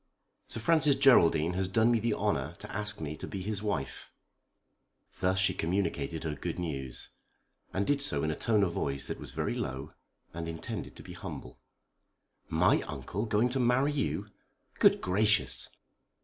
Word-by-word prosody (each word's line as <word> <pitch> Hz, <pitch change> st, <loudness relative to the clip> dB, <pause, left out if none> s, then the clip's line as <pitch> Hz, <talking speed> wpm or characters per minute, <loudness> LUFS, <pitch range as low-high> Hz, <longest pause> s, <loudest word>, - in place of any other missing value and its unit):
Sir -, -, -3 dB
Francis 150 Hz, +3 st, +4 dB
Geraldine 90 Hz, -, +5 dB
has 95 Hz, +1 st, 0 dB
done 110 Hz, +5 st, +3 dB
me 115 Hz, -, +3 dB
the 115 Hz, 0 st, 0 dB
honour 85 Hz, -7 st, -1 dB
to 105 Hz, -, -8 dB
ask 105 Hz, +1 st, +3 dB
me 75 Hz, -1 st, -4 dB
to -, -, -6 dB
be 95 Hz, -2 st, -5 dB
his 105 Hz, 0 st, -2 dB
wife." 100 Hz, -11 st, -3 dB, 1.1 s
Thus 95 Hz, +1 st, +1 dB
she 95 Hz, 0 st, +3 dB
communicated 85 Hz, -3 st, -1 dB
her 80 Hz, -2 st, -2 dB
good 70 Hz, -, -4 dB
news; 70 Hz, -7 st, -5 dB, 0.6 s
and 100 Hz, +1 st, 0 dB
did 145 Hz, +3 st, +1 dB
so 75 Hz, -, +1 dB
in 80 Hz, -, +1 dB
a -, -, -2 dB
tone 110 Hz, -3 st, +2 dB
of 90 Hz, -, +1 dB
voice 70 Hz, -4 st, -2 dB
that -, -, -5 dB
was -, -, -9 dB
very -, -, -2 dB
low, 65 Hz, +5 st, -4 dB, 0.4 s
and 85 Hz, 0 st, -5 dB
intended 80 Hz, 0 st, -5 dB
to -, -, -11 dB
be -, -, -9 dB
humble. 60 Hz, -, -8 dB, 0.9 s
"My -, -, +3 dB
uncle 105 Hz, +5 st, -4 dB
going 110 Hz, +3 st, +2 dB
to 130 Hz, +2 st, -1 dB
marry 125 Hz, +4 st, +3 dB
you? 145 Hz, -2 st, -2 dB, 0.5 s
Good -, -, +5 dB
gracious!" 105 Hz, +3 st, +2 dB
95 Hz, 170 wpm, -30 LUFS, 80-110 Hz, 1.1 s, Geraldine